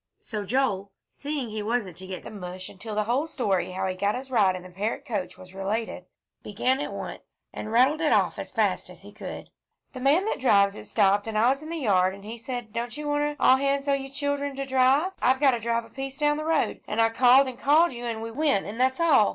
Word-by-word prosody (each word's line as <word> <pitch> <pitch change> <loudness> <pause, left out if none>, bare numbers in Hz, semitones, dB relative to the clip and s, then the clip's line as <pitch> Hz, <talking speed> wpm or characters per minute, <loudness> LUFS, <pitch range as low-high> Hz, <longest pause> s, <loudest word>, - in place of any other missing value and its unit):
So 210 -2 -5
Joel, 200 -5 0 0.2
seeing 285 -3 -4
he 215 0 -4
wasn't 210 -5 -2
to 185 - -9
get 185 -1 -6
the - - -9
mush 185 -2 -7
until 210 +2 -8
the 210 - +1
whole 250 +8 0
story 200 - -1
how 190 +1 -3
he 185 - -1
got 200 +3 0
his 260 +1 -7
ride 195 -6 +3
in 180 - -7
the 185 - -12
Parrott 205 +5 -3
coach 205 -6 -4
was 185 0 -14
related, 200 +4 -3 0.4
began 250 +6 0
at - - -4
once, - - -9
and 215 - -6
rattled 260 +7 +4
it 315 - +2
off - - +2
as - - -6
fast - - 0
as - - -14
he - - -12
could. - - -8 0.4
"The 255 - -7
man 290 +9 +3
that 440 - -2
drives 200 -6 +4
it - - -10
stopped 205 0 +2
an' 220 -1 -2
I 230 +3 +4
was 275 +2 0
in 310 - -9
th' 335 - -3
yard 190 -7 +2
an' 200 - -14
he 225 +3 -7
said 240 -3 -6
don't 235 +2 -4
you 300 0 -5
wanter 295 0 0
all 260 - +6
hands 275 +1 0
o' 280 - +3
you 270 -1 -2
children 285 0 -2
to 275 0 -3
drive 265 +6 +3
I've 260 +1 +3
got 280 -2 +5
to 240 - -1
drive 230 +1 -1
a - - -17
piece 270 +1 -6
down 295 0 +1
th' 310 - -4
road 320 -3 0
an' 215 - -2
I 225 0 +5
called 255 +4 +5
and 255 -1 -7
called 300 +3 +4
you 240 0 -7
an' 225 -2 -3
we 230 0 -5
went 280 -5 +1
an' 215 +4 -7
that's 260 +2 +2
all. 330 - +5
240 Hz, 255 wpm, -26 LUFS, 205-275 Hz, 0.4 s, all